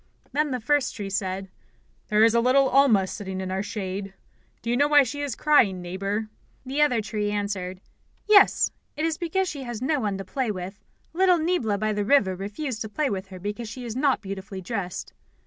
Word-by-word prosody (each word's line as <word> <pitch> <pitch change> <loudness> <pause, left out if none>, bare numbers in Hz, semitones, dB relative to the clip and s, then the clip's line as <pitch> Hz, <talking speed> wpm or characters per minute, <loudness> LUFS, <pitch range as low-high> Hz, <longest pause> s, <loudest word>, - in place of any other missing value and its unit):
Then 300 +1 +1
the 255 -2 -2
first 285 +3 +1
tree 200 -2 -5
said: 190 -1 -3 0.6
"There 210 +1 +4
is 225 0 +5
little 255 +3 +4
Alma 250 -8 +5
sitting 190 -1 -5
in 190 0 -4
our 190 +1 -1
shade. 195 -2 -5 0.5
Do 230 - -1
you - - +2
know 285 +3 +4
why 295 -1 +6
she 280 +3 -4
is 280 -5 -2
crying, 245 -12 +3
Neighbour?" 195 +5 -3 0.4
The 275 +3 -1
other 250 -7 +3
tree 210 0 -2
answered: 200 -3 -3 0.5
"Yes, 405 -2 +6 0.3
it 310 - 0
is 325 +1 -1
because 370 +2 0
she 290 -5 -5
has 240 -4 -5
no 275 +4 0
one 205 -5 -1
to 195 - -6
play 255 +5 -2
with. 190 0 -6 0.3
Little 365 +1 +4
Niebla 315 - 0
by 215 +1 0
the 205 0 -1
river 205 -5 +3
refused 215 +6 -5
to 220 - -4
play 275 +5 -1
with 195 -1 -4
her 190 -1 -10
because 210 +4 -5
she 245 +2 -7
is 230 -1 -5
not 270 -3 +2
beautifully 195 -1 -6
dressed." 185 -2 -5
215 Hz, 200 wpm, -25 LUFS, 195-275 Hz, 0.6 s, why